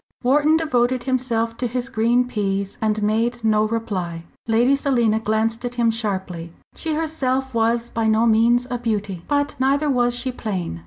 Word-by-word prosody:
Wharton 295 +5 +4
devoted 255 -5 +1
himself 240 -3 -1
to 245 - -1
his 245 +1 -3
green 245 0 +1
peas, 200 -4 -2
and 215 -1 0
made 230 +3 0
no 215 -1 +3
reply. 190 -7 -3 0.2
Lady 235 +4 +3
Selina 240 -6 +1
glanced 225 +2 -1
at 245 0 -4
him 235 -1 +2
sharply. 190 -7 -4 0.2
She 320 -2 -3
herself 265 -5 -1
was 230 +1 0
by 225 -1 0
no 220 +1 +3
means 235 +2 +3
a 245 - -2
beauty. 205 -6 -2
But 285 0 0
neither 280 +3 +2
was 245 -2 +1
she 255 +1 -2
plain. 190 - -4
235 Hz, 165 wpm, -21 LUFS, 220-255 Hz, 0.2 s, Wharton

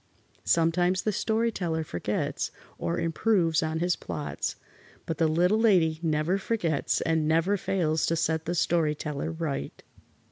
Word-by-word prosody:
Sometimes 175 +2 +2
the 215 - +1
Story 225 +3 0
Teller 165 -6 -2
forgets 85 - -2 0.3
or 170 - -1
improves 165 -1 +2
on 160 0 -1
his 175 +1 +1
plots, 145 - -4 0.5
but 160 - -4
the 165 - +4
Little 180 +7 +3
Lady 175 -8 +3
never 160 +3 +1
forgets 175 -9 0
and 160 -2 +1
never 165 +5 +2
fails 165 -5 0
to 165 - +1
set 160 0 0
the 175 - -2
Story 165 -2 +2
Teller 150 +1 -4
right. 160 - -4
165 Hz, 145 wpm, -27 LUFS, 160-180 Hz, 0.5 s, the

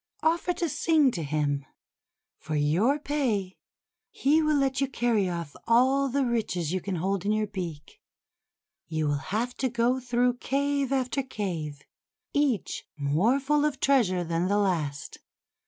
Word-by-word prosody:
Offer 340 +3 +2
to 345 - -1
sing 310 -2 +3
to 175 - -4
him. 145 -1 -1 0.8
For 155 +1 -4
your 170 - +2
pay, 250 -11 -2 0.5
he 300 +4 +2
will 305 -1 +2
let 270 -1 +1
you 275 - +2
carry 235 -7 +1
off 170 -4 -5
all 260 +4 +4
the 275 +1 +1
riches 185 -9 -1
you 185 - -1
can 195 0 -3
hold 190 +2 -1
in 205 - 0
your 215 0 +1
beak. 175 -8 -7 0.9
You 155 -1 -1
will 145 -1 0
have 235 +5 -1
to 260 - 0
go 240 +2 +1
through 245 0 +1
cave 280 +1 0
after 265 0 0
cave, 170 - -5 0.5
each 285 -8 0
more 160 - +2
full 295 +2 +1
of 300 -3 0
treasure 215 -10 +3
than 170 +1 -1
the 200 +2 +2
last. 165 -8 -1
230 Hz, 155 wpm, -27 LUFS, 170-275 Hz, 0.9 s, all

